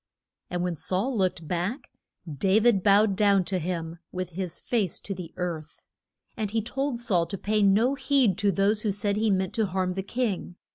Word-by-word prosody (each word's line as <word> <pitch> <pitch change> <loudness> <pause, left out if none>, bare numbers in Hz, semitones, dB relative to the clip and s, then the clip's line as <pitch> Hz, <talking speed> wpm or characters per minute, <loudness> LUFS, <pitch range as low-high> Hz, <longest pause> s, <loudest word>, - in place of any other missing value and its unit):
And 175 0 -2
when 180 -1 -1
Saul 195 - -1
looked 185 -5 0
back, 180 - -3 0.3
Da 185 +6 +1
vid 220 -4 +4
bowed 200 +1 +4
down 200 -2 +4
to 185 0 -1
him 165 -1 -4
with 185 -1 -4
his 180 -1 -4
face 210 -8 -1
to 200 - -5
the 180 -3 -8
earth. 165 -4 -5 0.5
And 215 -2 -2
he 225 +2 0
told 270 +1 -2
Saul 185 -8 +1
to 195 - -4
pay 210 +3 0
no 210 +6 +4
heed 275 -8 +2
to 205 -2 +3
those 200 +3 +1
who 215 - 0
said 200 0 0
he 220 +1 +1
meant 190 -2 0
to 220 -2 +1
harm 185 0 -1
the 190 - -2
king. 200 -4 -2
195 Hz, 195 wpm, -27 LUFS, 180-215 Hz, 0.5 s, vid